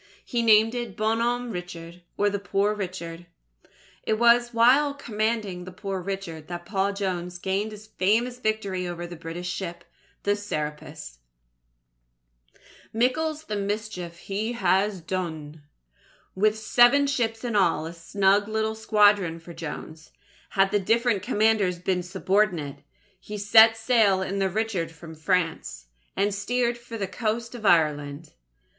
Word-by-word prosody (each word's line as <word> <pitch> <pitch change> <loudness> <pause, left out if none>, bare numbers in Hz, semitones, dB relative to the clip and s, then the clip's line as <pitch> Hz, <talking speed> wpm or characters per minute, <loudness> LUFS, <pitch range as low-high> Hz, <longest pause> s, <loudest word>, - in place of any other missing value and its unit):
He 240 -2 -1
named 220 0 +5
it 240 -5 -5
Bon 220 +1 +1
Homme 240 +1 -1
Richard, 175 -2 -8 0.2
or 205 - +2
The 200 0 0
Poor 200 +1 0
Richard. 175 -4 -6 0.7
It 215 - 0
was 240 +1 +4
while 260 +5 +4
commanding 215 -7 -2
The 185 - -9
Poor 195 0 -4
Richard, 175 -5 -5
that 175 -1 -6
Paul 195 0 0
Jones 180 -3 -3
gained 195 +4 -2
his 210 0 -11
famous 220 +5 0
victory 200 -5 -1
over 175 0 -5
the 175 0 -8
British 170 +2 -5
ship, 175 -2 -6 0.4
the 205 0 +2
Serapis. 150 - -6 1.7
MICKLE'S 300 +7 0
THE 215 - -4
MISCHIEF 200 -4 -4
HE 205 +6 -3
HAS 200 -4 +1
DUNE 160 -4 -5 0.7
With 215 +3 +2
seven 240 +6 +5
ships 235 -5 -1
in 235 -3 -2
all 170 -5 +2
a 165 - -6
snug 195 +4 +2
little 220 0 -1
squadron 205 -6 +3
for 170 +1 -11
Jones, 160 -1 -8 0.4
had 195 -1 +2
the 205 - +2
different 225 +1 +1
commanders 205 -3 +2
been 180 +1 -1
subordinate 185 -4 0 0.4
he 210 +2 -7
set 220 +2 +6
sail 225 -5 +3
in 195 +1 -3
the 195 -1 +1
Richard 200 -4 -2
from 165 0 -11
France, 160 - -2 0.3
and 200 +1 +1
steered 240 +4 -1
for 235 -1 -8
the 200 - -2
coast 220 +4 -3
of 225 -4 -3
Ireland. 150 -2 +1
200 Hz, 140 wpm, -25 LUFS, 175-220 Hz, 1.7 s, set